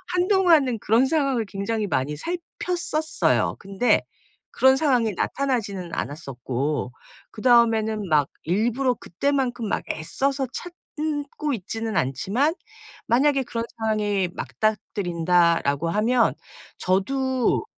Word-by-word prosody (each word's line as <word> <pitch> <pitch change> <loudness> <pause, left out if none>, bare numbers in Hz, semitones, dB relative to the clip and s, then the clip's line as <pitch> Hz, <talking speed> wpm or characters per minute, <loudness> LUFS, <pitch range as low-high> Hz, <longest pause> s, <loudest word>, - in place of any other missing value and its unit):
한동안은 355 - +3
그런 225 +6 +3
상황을 275 -6 +1
굉장히 205 +2 -2
많이 145 -5 -1
살폈었어요. 340 - -1
근데 195 +5 +1 0.5
그런 265 0 +5
상황이 255 -7 +2
나타나지는 205 -9 -2
않았었고 135 -1 -3 0.4
그다음에는 220 -3 +3
막 150 -3 +3 0.2
일부러 235 - +1
그때만큼 245 +3 -1
막 - - -1
애써서 270 - -1
찾고 300 -4 -4
있지는 225 +1 -4
않지만 200 - 0 0.5
만약에 270 +3 +3
'그런 230 -1 -3
상황이 210 -4 0
맞닥뜨린다.'라고 170 -7 +1
하면 230 +5 +2 0.5
저도 260 - +1
225 Hz, 265 characters per minute, -24 LUFS, 190-275 Hz, 0.5 s, 그런